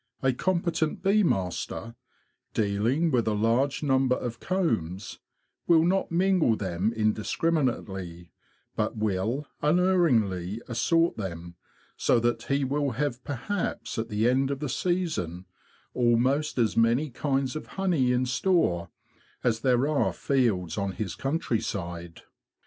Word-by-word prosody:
A 130 -1 +3
competent 170 +2 -1
bee 200 +2 +4
master, 95 - -2 0.6
dealing 115 +10 +1
with 120 -4 +1
a 110 - +1
large 120 +8 +1
number 130 -2 +3
of 120 -2 -5
combs, 110 - -2 0.5
will 165 -2 +5
not 190 +1 +1
mingle 175 -8 +3
them 95 +1 -1
indiscriminately, 110 - -1 0.4
but - - -1
will 110 +7 -1 0.2
unerringly 135 - +2
assort 165 +8 +1
them, 85 -4 -6 0.4
so 120 - +3
that 120 0 0
he 140 0 +1
will 140 0 0
have 130 -1 -2
perhaps 140 - -3
at 115 - -3
the 105 +2 +1
end 135 +2 +2
of 140 -1 -2
the 150 -1 -3
season 155 - -2 0.5
almost 125 +5 +2
as 115 -3 +2
many 120 +6 +2
kinds 135 +1 -1
of 155 - -6
honey 170 -10 +2
in 125 +1 +1
store 130 - +1 0.5
as 115 -2 +1
there 125 +2 +2
are 150 -2 +1
fields 105 - 0
on 100 -1 -2
his 95 -3 -4
countryside. 95 - -3
125 Hz, 125 wpm, -27 LUFS, 105-150 Hz, 0.6 s, will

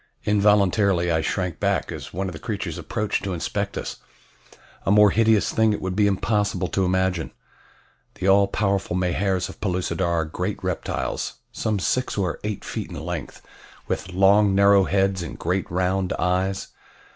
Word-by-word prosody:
Involuntarily 100 -3 +3
I 80 -1 +2
shrank 90 0 -2
back - - 0
as - - -7
one 95 +3 -3
of 90 - -5
the 80 - -8
creatures - - -4
approached 105 -1 -2
to 95 -1 -2
inspect 80 - -3
us. - - -5 0.9
A - - -2
more 105 0 +6
hideous 110 -2 +3
thing 110 -1 +3
it - - -3
would 95 0 -3
be 105 0 +3
impossible 105 +1 0
to 95 - +1
imagine. 95 -2 0 0.9
The 95 - -3
all 100 +1 +5
powerful 100 -3 -1
Mahars 90 +1 0
of - - -12
Pellucidar 90 -1 -1
are 85 -2 +1
great 90 +5 -3
reptiles, 90 -2 -2 0.2
some 110 -1 -1
six 125 +6 -1
or 95 -4 -1
eight 105 -1 -4
feet - - -5
in - - -7
length, - - -6 0.4
with 90 - -3
long 100 +2 +4
narrow 100 -1 +5
heads 95 -1 +1
and 85 - -6
great 90 +2 -1
round 95 +1 0
eyes. 95 +2 -1
95 Hz, 165 wpm, -23 LUFS, 90-100 Hz, 0.9 s, more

